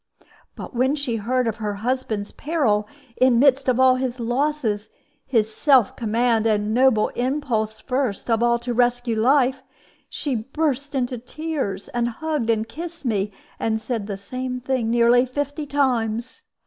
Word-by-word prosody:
But - - -8
when 260 +4 +2
she 275 -6 -2
heard 250 +4 0
of 225 -1 -2
her 210 -2 -3
husband's 220 -2 -2
peril, 250 -10 0 0.3
in 255 0 +4
the - - +4
midst 270 0 +4
of 250 0 +2
all 260 -1 +5
his 255 -1 -3
losses, 240 -3 -1 0.4
his 220 -4 +1
self 265 -6 +4
command, 230 0 +1
and 210 0 +1
noble 245 -3 +4
impulse 245 -5 -1
first 250 -4 -2
of 230 -1 +1
all 235 0 +3
to 240 +1 -4
rescue 245 -1 +1
life, 260 +3 +3 0.5
she 285 - -3
burst 280 +4 -2
into 250 -2 -1
tears, 280 -5 -4
and 240 0 -1
hugged 295 -1 -3
and 220 -1 +1
kissed 330 +4 -6
me, 210 -3 0 0.3
and 220 -1 0
said 220 -2 -3
the 200 -2 -4
same 255 +5 -5
thing 250 -2 -1
nearly 240 +1 +5
fifty 290 +3 -3
times. 250 -4 -1
245 Hz, 160 wpm, -23 LUFS, 225-265 Hz, 0.5 s, all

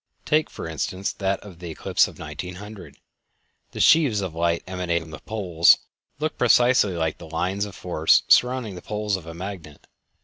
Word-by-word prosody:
Take, 155 +1 +2
for - - -7
instance, 90 +4 -3
that 95 0 -1
of 95 -5 -13
the 90 -1 -7
eclipse 80 - +1
of - - -12
1900. 90 +6 -8 0.7
The - - -9
sheaves 140 -11 +4
of 95 -4 -4
light 85 0 0
emanating 90 -2 -2
from 80 - -13
the 75 - -8
poles 90 -6 +3 0.4
look 155 +2 -3
precisely 120 -4 +4
like 80 -2 -2
the 85 - -10
"lines 95 +5 -1
of 100 -2 -10
force" 80 -3 +2
surrounding 125 -4 +3
the 90 - -9
poles 105 -1 -2
of 90 -4 -8
a 80 - -8
magnet. 85 -5 -8
95 Hz, 175 wpm, -24 LUFS, 85-105 Hz, 0.7 s, sheaves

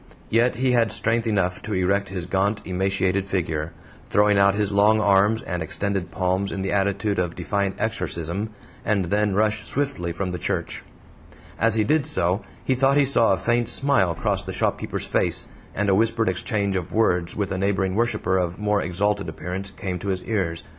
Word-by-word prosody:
Yet 120 +2 +3
he 130 0 +1
had 115 -2 +3
strength 115 +2 +1
enough 95 -3 0
to 110 - -4
erect 95 +2 +1
his 90 -2 -4
gaunt 100 +4 0
emaciated 95 +1 0
figure, 80 -5 -2 0.4
throwing 105 -1 +3
out 100 0 +4
his 105 -1 0
long 105 +2 +4
arms 105 +2 +3
and 90 -2 -4
extended 95 +3 -2
palms 95 +2 -1
in 95 - -3
the 95 - -2
attitude 100 0 0
of 90 -2 -2
defiant 100 +2 -1
exorcism, 100 -2 -3 0.3
and 105 -3 +1
then 105 +2 +1
rush 110 +1 +1
swiftly 135 -11 -1
from 90 +2 -3
the 90 - -4
church. - - -2 0.8
As 115 0 +3
he 110 - +2
did 150 +6 +1
so 90 - 0 0.2
he 130 - +1
thought 135 +2 +3
he 145 - +5
saw 115 -6 +4
a - - 0
faint 120 +5 0
smile 120 -11 +3
cross - - -1
the - - -6
shopkeeper's - - -2
face, - - +1 0.3
and 105 +1 0
a 100 - +4
whispered 115 +1 +2
exchange 100 +1 -1
of 90 +1 -4
words 90 -6 +1
with 100 -2 -2
a 95 - -2
neighboring 95 -1 0
worshiper 105 -4 0
of 90 -1 -2
more 105 0 +1
exalted 100 +1 -1
appearance 90 +5 -5
came 95 -2 -5
to 100 - -7
his 95 -2 -2
ears. 90 -7 -2
100 Hz, 190 wpm, -23 LUFS, 95-110 Hz, 0.8 s, he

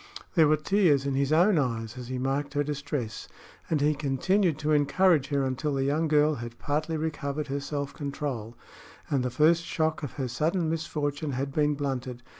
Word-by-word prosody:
There 160 -4 +5
were 155 +1 +4
tears 155 -4 +2
in 140 - 0
his 135 +1 0
own 175 +3 +5
eyes 115 -3 -2
as 125 -2 -7
he 130 0 -3
marked 140 +2 -2
her 145 - +2
distress, 145 -5 -4 0.4
and 155 -3 +1
he 150 +1 +3
continued 155 +5 +1
to 155 0 -1
encourage 150 +1 +3
her 140 -2 0
until 135 +3 -1
the 135 - 0
young 150 +4 +1
girl 150 0 +4
had 120 -3 -7
partly 155 +2 -1
recovered 150 -2 -3
her 140 +1 -1
self 140 0 -4
control 140 -6 -4 0.5
and 135 -3 +2
the 125 - 0
first 155 +6 +3
shock 160 -1 -1
of 145 -5 -5
her 135 -3 -3
sudden 160 +7 0
misfortune 150 -2 -2
had 135 +2 -3
been 150 0 +2
blunted. 130 -3 -4
145 Hz, 190 wpm, -27 LUFS, 135-155 Hz, 0.5 s, There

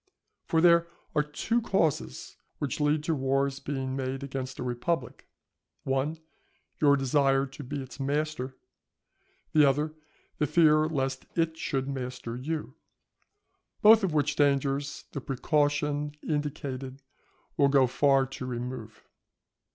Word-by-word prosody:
For 160 - +2
there 170 -1 +5 0.3
are 150 - +3
two 185 +11 -1
causes 155 - -1 0.2
which 145 0 -3
lead 150 +1 +2
to 160 - 0
wars 135 0 0
being 135 -2 -3
made 135 0 -3
against 130 -1 -5
a - - -4
republic; 125 +3 -3 0.6
one, 135 +4 0 0.6
your 140 -2 +5
desire 135 0 +2
to 135 +2 -10
be 140 +2 -4
its 130 +1 -12
master, 140 -2 -2 1.0
the 155 - +6
other 145 +2 +2 0.5
the 150 - +2
fear 155 -1 +5
lest 135 -4 -2
it 165 -1 +1
should 135 -4 -2
master 125 -3 -5
you; 150 +5 -4 1.1
both 220 0 +8
of 190 - +1
which 145 -1 +1
dangers 140 0 +1
the 140 - -5
precaution 145 +1 0
indicated 140 -3 -3 0.5
will 140 -3 +4
go 135 -1 +5
far 135 +1 +3
to 130 0 -7
remove. 120 -2 -6
140 Hz, 130 wpm, -28 LUFS, 135-150 Hz, 1.1 s, both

